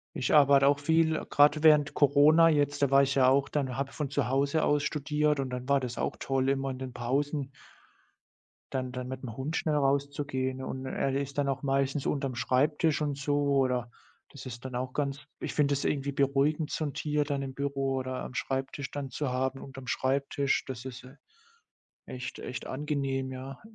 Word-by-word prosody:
Ich 125 - -1
arbeite 140 -2 +6
auch 145 - +4
viel, 160 +2 +1
grad 150 +1 +4
während 150 -2 +5
Corona 150 +3 +6
jetzt, 145 -2 +1
da 140 - +2
war 140 0 +7
ich 140 0 +1
ja 130 -1 +5
auch 135 +1 +2
dann 135 -4 -2
habe 135 0 -2
von 145 -3 -4
zu 140 -4 0
Hause 140 +4 +1
aus 145 -1 +2
studiert 150 0 0
und 135 - -2
dann 125 +1 -5
war 140 -1 +3
das 125 -2 -5
auch - - -2
toll, 135 0 0
immer 135 0 0
in 130 - -5
den 130 -1 -6
Pausen 140 +3 -2 1.2
dann 130 -1 -2
dann 125 0 -5
mit'm 130 -3 -6
Hund 145 +5 -3
schnell 155 -2 0
rauszugehen, 140 -2 -1
und 130 0 -5
er 135 0 -1
ist 140 +1 -3
dann 145 - +1
auch 135 -1 -2
meistens 135 0 0
unterm 135 -2 -1
Schreibtisch 145 +5 +1
und 145 -2 -2
so. 145 +1 0 0.2
Oder 125 -2 0 0.4
das - - -11
ist 120 +1 -9
dann 130 - -6
auch 130 +1 -3
ganz 140 -1 -2 0.2
ich - - -4
finde 145 -1 +2
das 140 - -2
irgendwie 140 -1 0
beruhigend, 140 +3 +1
so - - -2
'n 145 - -4
Tier 150 -1 0
dann 140 -1 -2
im 135 - -6
Büro 135 -1 -1
oder 130 0 -4
am - - -8
Schreibtisch 135 +1 -3
dann 140 -2 -5
zu 140 +1 -2
haben 130 +1 -2
unterm 135 -1 -10
Schreibtisch. 140 +2 0
Das 130 -1 -7
ist, 130 -1 -8
äh, 130 +3 -14 0.9
echt 125 0 -6
echt 125 - -6
angenehm, 135 -2 -2
ja. 130 +1 -8
135 Hz, 195 wpm, -29 LUFS, 130-145 Hz, 1.2 s, war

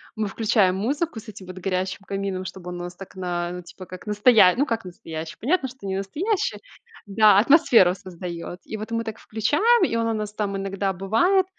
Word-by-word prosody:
мы 215 -1 -1
включаем 205 -3 +2
музыку 275 - -2
с 220 0 -12
этим 200 -2 -10
вот 185 0 -8
горящим 185 0 -2
камином, 195 -1 -3
чтобы 185 -1 -8
он 175 0 -6
у - - -5
нас 175 0 -7
так 195 +1 -11
на 180 -1 -3
типа 185 +2 -12
как 185 +3 -10
настоя 210 -2 +5
ну, 280 - +3
как 230 -4 -2
настоящий, 165 -3 -8
понятно, 275 +1 +1
что 250 -5 -13
не 190 - -2
настоящий. 320 - -1 0.5
Да, 205 0 +5
атмосферу 230 - +5
создает. 175 -1 -7
И - - -6
вот 215 +2 -7
мы 230 0 -1
так 220 0 -5
включаем, 310 - +2
и 230 - -2
он 230 0 +1
у 225 - 0
нас 210 -1 -4
там 205 -2 -2
иногда 195 0 -2
бывает 230 - +2
200 Hz, 200 wpm, -24 LUFS, 185-230 Hz, 0.5 s, настоя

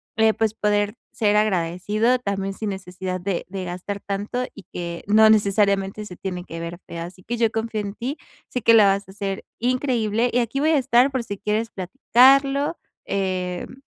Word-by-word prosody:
eh, 220 0 +4
pues, 220 -1 0
poder 205 +1 +1 0.2
ser 210 -2 +1
agradecido 210 +4 +1
también 195 -3 -2
sin 210 +1 -4
necesidad 185 -1 -5
de 185 -1 -2
de 190 -1 -5
gastar 185 +3 -5
tanto 205 +6 -3
y 205 - -12
que 170 -1 -5
no 220 +1 +6
necesariamente 200 -1 +2
se 180 - -9
tiene 180 -1 -5
que 165 - -7
ver 170 +1 -6
feo. 170 0 -5
Así 180 +2 -11
que 240 - -3
yo 225 -2 +2
confío 225 -1 -2
en 200 0 -6
ti, 260 +6 -4 0.3
sé 250 - -3
que 230 +1 +5
la 215 -3 +8
vas 195 0 +1
a - - -9
hacer 195 -1 -4 0.2
increíble, 245 -2 +1
y 245 - +2
aquí 245 +4 -1
voy 310 - +3
a 310 - +4
estar 260 0 +4
por 260 -3 -1
si 200 -2 -5
quieres 210 +2 -1
platicarlo, 270 - +3 0.3
eh, 185 -2 -2
m 255 - -14
205 Hz, 195 wpm, -23 LUFS, 190-230 Hz, 0.3 s, la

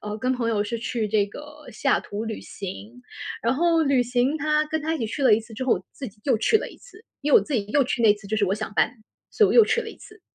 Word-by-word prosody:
呃， 210 0 -5
跟 255 +3 0
朋 245 -3 -1
友 210 -2 0
是 230 +3 -4
去 230 -1 -2
这 205 -1 +2
个 295 +7 -12
西 215 - -8
雅 - - +3
图 210 +2 -6
旅 220 -1 -5
行， 205 +5 -9 0.4
然 235 +3 +1
后 330 +2 +2
旅 275 -4 +3
行， 245 +4 0
他 305 0 +1
跟 315 +1 -2
他 320 +2 -1
一 - - -4
起 230 - -2
去 255 +6 -4
了 250 -5 +6
一 215 - 0
次 225 +1 -14
之 230 +4 -4
后， 255 - +3
我 - - -7
自 265 - -7
己 210 +1 -22
又 260 -6 +2
去 235 - +3
了 - - -4
一 - - -14
次。 - - -17 0.2
因 290 0 -1
为 - - +9
我 - - -2
自 305 - -7
己 210 -5 0
又 275 +6 +2
去 245 -1 -2
那 215 -2 +7
次 205 -1 -14
就 220 +2 -2
是 205 - +2
我 190 - 0
想 215 -1 -5
搬， - - +3 0.4
所 435 - +3
以 400 - +4
我 - - +1
又 460 - +8
去 470 - +1
了 - - -7
一 - - -14
次。 - - -16
245 Hz, 335 characters per minute, -24 LUFS, 215-295 Hz, 0.4 s, 为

